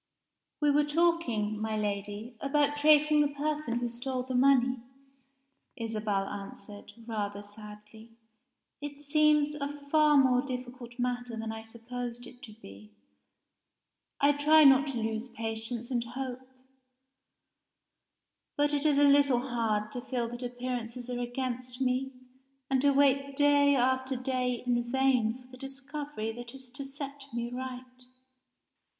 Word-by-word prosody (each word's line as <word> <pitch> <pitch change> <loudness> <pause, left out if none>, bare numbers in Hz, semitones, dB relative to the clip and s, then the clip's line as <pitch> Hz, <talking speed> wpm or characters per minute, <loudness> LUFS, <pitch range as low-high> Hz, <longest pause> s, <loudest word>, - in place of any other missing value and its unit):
"We 295 -1 +3
were 295 +1 +4
talking, 295 -10 +1
my 220 0 -1
Lady, 205 +3 -3
about 290 +1 +1
tracing 300 0 +5
the 295 - +3
person 290 -3 -2
who 240 0 -1
stole 250 +2 -3
the 260 0 -5
money," 255 -1 +4 1.0
Isabel 215 -4 -2
answered, 205 +1 -9
rather 205 -3 -3
sadly. 210 +1 -12 0.7
"It 290 0 -7
seems 300 0 +3
a 290 -1 -3 0.2
far 305 -1 +5
more 255 -2 +5
difficult 250 -2 -7
matter 245 -1 -2
than 225 0 -4
I 220 0 -6
supposed 240 +2 -7
it 250 - -14
to 240 -6 -10
be. 105 - -13 1.3
I 285 +1 +5
try 305 +2 +6
not 275 0 +7
to 270 -3 -3
lose 220 +2 -2
patience 225 +1 -5
and 240 -2 +1
hope 255 +1 -6 2.1
but 290 0 +2
it 290 +1 +2
is 290 -2 +3
a 290 - +5
little 280 -3 +4
hard 215 -3 0
to 245 - -5
feel 245 -2 -2
that 240 +1 -7
appearances 245 0 -5
are 245 - -3
against 250 0 -4
me, 260 0 0 0.6
and 265 -1 +3
to 285 - +4
wait 275 0 +3
day 285 0 +5
after 260 +1 +1
day 250 -1 -1
in 240 -1 +2
vain 250 -1 +1
for 250 - -21
the 255 - -11
discovery 275 -3 -5
that 240 +2 -9
is 260 -2 -13
to 275 +2 -7
set 275 0 -8
me 235 0 -3
right." 255 0 -7
250 Hz, 140 wpm, -30 LUFS, 235-280 Hz, 2.1 s, not